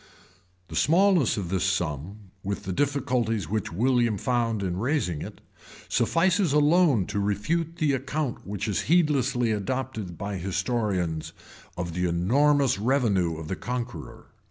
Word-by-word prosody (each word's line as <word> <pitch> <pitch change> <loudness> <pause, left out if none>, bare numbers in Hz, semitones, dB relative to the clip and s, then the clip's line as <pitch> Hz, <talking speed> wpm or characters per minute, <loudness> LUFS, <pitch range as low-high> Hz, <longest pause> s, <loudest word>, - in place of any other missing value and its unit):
The - - -7
smallness 175 - +3
of 95 -4 -3
this 95 -1 0
sum, 95 +2 -3
with 100 +1 -3
the 95 - -3
difficulties 125 - 0
which 105 +2 -2
William 120 +2 +2
found 115 -1 0
in 90 -2 -2
raising 115 - -1
it, - - -8 0.5
suffices 180 -1 +2
alone 150 - +4
to 100 +1 -3
refute 150 - -1
the 150 -4 +1
account 135 0 -2
which 100 +1 -3
is 105 - 0
heedlessly 135 -8 +2
adopted 110 -3 -3
by 100 +2 -4
historians, 95 -3 -2 0.4
of 85 -1 -3
the 90 +1 0
enormous 130 +8 +2
revenue 105 - +1
of 80 -1 -7
the 95 - -2
Conqueror. 125 +1 -6
115 Hz, 135 wpm, -26 LUFS, 95-140 Hz, 0.5 s, alone